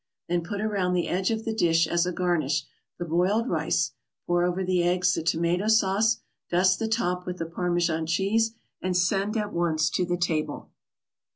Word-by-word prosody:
Then 175 0 0
put 200 +4 -5
around 200 -4 0
the 175 - 0
edge 185 +1 0
of 220 -1 -2
the 225 - -1
dish 165 -6 +3
as 170 +2 +1
a - - 0
garnish 155 -5 0 0.3
the 175 - -4
boiled 185 +8 +1
rice, - - 0 0.3
pour 175 0 +2
over 180 +1 -1
the 180 -1 +1
eggs 180 +1 +2
the - - -1
tomato 170 +4 0
sauce, 220 +1 +3 0.3
dust 185 +1 +3
the 225 - -1
top 180 -5 -1
with 180 0 -4
the 165 - -3
Parmesan 170 -1 -1
cheese 215 +6 +1 0.3
and 180 -1 0
send 195 +4 +1
at 210 -1 -2
once 160 -2 +1
to 185 - 0
the 175 0 -1
table. 160 -3 -2
180 Hz, 185 wpm, -26 LUFS, 170-200 Hz, 0.3 s, dish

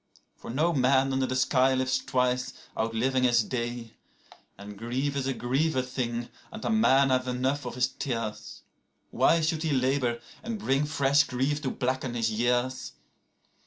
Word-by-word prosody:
32For 115 - -7
no 165 +4 +2
man 135 0 +3
under 130 0 +1
the 130 - -2
sky 130 0 +3
lives 130 0 +1
twice, 125 0 0 0.2
outliving 115 +4 0
his 120 -2 +4
day.33And 115 -4 -8
grief 125 +7 -2
is 135 -1 -1
a 135 - 0
grievous 130 0 -1
thing, 120 -2 -2 0.2
and 220 -1 -8
a - - +1
man 140 -12 +4
hath 130 0 +1
enough 130 +3 -1
of 120 - -6
his 125 -1 +2
tears:34Why 125 +6 -2
should 160 -1 -1
he 160 - -1
labour, 130 -3 +1 0.2
and 230 -1 -4
bring 135 -6 +1
fresh 140 -1 +3
grief 140 +3 -1
to 135 - -2
blacken 130 -1 -2
his 115 -1 0
years? 120 +3 -1
130 Hz, 155 wpm, -27 LUFS, 120-140 Hz, 0.2 s, his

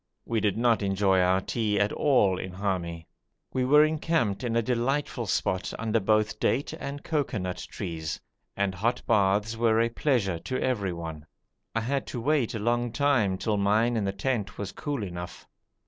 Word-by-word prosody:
We 115 -1 0
did 105 -1 0
not 115 -1 +3
enjoy 95 -1 +2
our 90 +1 +3
tea 105 -1 0
at 100 +1 +1
all 105 -11 +3
in 95 -1 -6
Hami. 90 -4 -3 0.5
We 130 -1 +1
were 150 +3 +6
encamped 155 -9 0
in 115 -2 -1
a 115 - +4
delightful 125 0 -1
spot 95 0 0
under 115 0 +1
both 110 +1 +1
date 135 +4 0
and 140 +1 -6
cocoanut 110 - -2
trees, 80 -2 -4 0.4
and 100 -1 +1
hot 110 +7 -1
baths 105 +1 +2
were 115 -1 +3
a 115 0 +3
pleasure 115 - 0
to 130 +9 -3
everyone. 85 -10 -3 0.5
I 115 - +1
had 135 +4 -1
to 125 - -4
wait 135 -2 +1
a - - -1
long 120 +2 0
time 120 -10 +2
till 105 +2 0
mine 110 +4 +2
in 110 - 0
the 100 - 0
tent 100 -1 -2
was 100 -1 -4
cool 145 -6 -3
enough. 90 -2 -7
110 Hz, 175 wpm, -27 LUFS, 95-125 Hz, 0.5 s, were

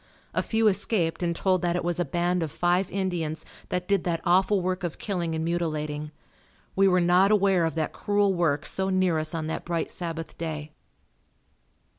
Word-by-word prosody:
A - - +1
few 225 -1 +1
escaped 190 -4 +1
and 170 -1 0
told 185 0 +1
that 175 -1 0
it 175 - -1
was 175 0 0
a 175 - +1
band 175 +4 0
of 160 -3 -2
five 175 +4 +1
Indians 175 -5 -2 0.2
that 180 0 -2
did 200 -3 +2
that 170 -2 -1
awful 190 +3 +3
work 185 +1 -2
of 170 -3 -3
killing 175 -5 -2
and 160 0 -2
mutilating. 155 -3 -2 0.7
We 195 0 +4
were 180 -1 +4
not 180 +3 +4
aware 195 -4 +3
of 160 - -2
that 160 -2 -2
cruel 205 -1 +1
work 155 -4 0
so 190 0 0
near 185 -4 +2
us 155 +1 -4
on 160 -1 -2
that 160 - -4
bright 170 -1 -2
Sabbath 165 -2 -5
day. 155 -2 -4
175 Hz, 190 wpm, -26 LUFS, 165-190 Hz, 0.7 s, We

